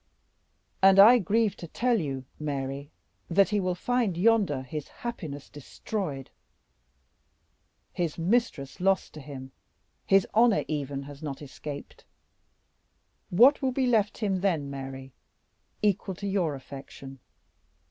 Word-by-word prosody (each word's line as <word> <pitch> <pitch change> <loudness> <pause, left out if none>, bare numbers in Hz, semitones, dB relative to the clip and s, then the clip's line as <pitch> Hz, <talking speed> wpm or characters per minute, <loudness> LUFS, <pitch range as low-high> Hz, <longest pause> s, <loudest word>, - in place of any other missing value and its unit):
"And 195 0 +6
I 225 +5 +9
grieve 215 +2 +1
to 170 - -8
tell 240 +6 +1
you, 135 -3 -4
Mary, 140 -1 -4 0.4
that 195 +3 +4
he 210 -1 +1
will 185 -2 -1
find 235 -3 0
yonder 195 -9 +2
his 145 +3 -6
happiness 160 - -7
destroyed, 145 - -6 1.6
his 170 -4 -2
mistress 170 - 0
lost 195 +1 +1
to 155 - -9
him. 135 -2 -9 0.6
His 195 -2 +5
honor 225 -1 +4
even 140 -2 -3
has 140 0 -11
not 145 -3 -5
escaped. 145 0 -9 1.3
What 250 +11 +6
will 265 -1 +1
be 260 0 +1
left 220 -4 +2
him, 200 -4 -1
then, 160 -8 0
Mary, 135 -1 -7 0.7
equal 195 -2 +1
to 200 - -7
your 180 -7 0
affection? 135 0 -10
170 Hz, 125 wpm, -27 LUFS, 140-210 Hz, 1.6 s, I